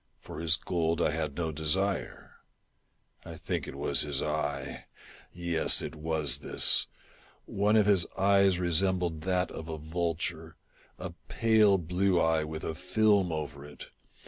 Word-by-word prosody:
For 75 - -9
his 85 +1 +2
gold 85 -3 -1
I - - +2
had 80 -3 -3
no 80 -2 -2
desire. 85 +6 -2 0.9
I - - -9
think - - -4
it - - -7
was - - +1
his 75 -2 -1
eye! 75 -1 -3 0.5
yes, 85 -2 0
it 75 - -5
was 80 -1 0
this! - - +2 0.6
One 105 +2 +1
of 105 -2 +5
his 100 -5 +3
eyes 100 -1 +4
re 90 -1 -1
sembled 90 -2 +1
that 90 -1 0
of 80 0 -8
a 80 - -4
vulture 80 0 -3 0.2
— - - -29
a 90 -1 -6 0.2
pale 110 -5 +4
blue 90 +2 +1
eye, 80 -1 +2
with 80 0 -6
a 80 - -3
film 95 +2 +2
over 75 -3 -5
it. 75 0 -11
85 Hz, 155 wpm, -29 LUFS, 80-95 Hz, 0.9 s, of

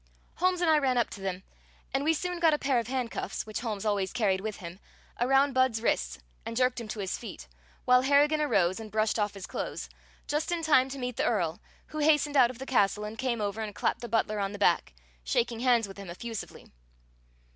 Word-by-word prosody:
Holmes 365 0 +1
and 345 - +3
I 310 - +5
ran 260 -3 +1
up 240 - +1
to 195 - -8
them, 190 -1 -3 0.5
and 270 +1 +1
we 320 +2 +3
soon 360 +2 -3
got 325 -3 +4
a - - -2
pair 275 -4 +1
of 230 - -4
handcuffs, 255 -2 -3
which 215 -1 -4
Holmes 220 -4 -4
always 200 -3 0
carried 200 -6 +1
with 215 0 -4
him, 175 -1 -9 0.4
around 270 +3 +3
Budd's 260 -3 +2
wrists 60 - 0 0.3
and 230 - -5
jerked 255 -1 +2
him 230 - -7
to 210 0 -5
his 190 -1 -3
feet, 235 - -9 0.4
while 250 0 +6
Harrigan 290 +3 +4
arose 190 -10 +2
and 220 -1 -8
brushed 215 +1 +1
off 205 -1 0
his 195 -2 -7
clothes, - - -5 0.4
just 300 +3 -1
in 340 -1 -1
time 270 -4 +4
to 275 - -6
meet 250 -2 -4
the - - +1
Earl, 175 -8 0 0.3
who 310 - -5
hastened 295 -1 +3
out 255 -3 +6
of 250 - -8
the 265 - -7
castle 210 -5 +2
and 210 +1 -5
came 245 -4 -1
over 205 +2 -2
and 210 -2 -5
clapped - - -1
the 240 - -6
butler 215 -2 0
on 200 0 -2
the - - -6
back, 175 - +2 0.3
shaking 230 - 0
hands 240 -3 +3
with 195 0 -11
him 195 -3 -8
effusively. 225 +5 -7
235 Hz, 225 wpm, -29 LUFS, 205-270 Hz, 0.5 s, while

